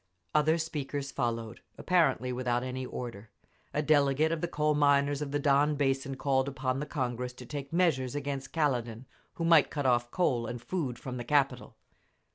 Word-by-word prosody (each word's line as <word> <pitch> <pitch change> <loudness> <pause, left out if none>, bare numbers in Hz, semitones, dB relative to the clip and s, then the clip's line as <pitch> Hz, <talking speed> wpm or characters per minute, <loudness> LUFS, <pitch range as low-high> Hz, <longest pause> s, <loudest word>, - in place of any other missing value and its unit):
Other 155 +2 +3
speakers 145 -3 -4
followed, 115 -3 -3 0.2
apparently 135 -9 +2
without 125 -1 -1
any 130 0 -4
order. 115 -4 -7 0.4
A 150 - -1
delegate 145 +1 +3
of 165 -1 -2
the 175 - 0
coal 150 -2 +1
miners 145 -1 +3
of 145 - -3
the 145 - 0
Don 145 +1 +3
Basin 135 -1 0
called 135 0 +1
upon 130 -1 -2
the 150 - -4
Congress 125 -3 -3
to 125 0 -11
take 140 +1 -6
measures 155 -7 +1
against 140 -1 -4
Kaledin, 125 -6 -1 0.3
who 165 - -2
might 165 -3 +6
cut 145 -2 -3
off 120 -1 +2
coal 120 -8 0
and 120 +1 -5
food 130 -2 -3
from 125 0 -6
the 120 - -4
capital. 135 -1 0
135 Hz, 175 wpm, -30 LUFS, 125-150 Hz, 0.4 s, might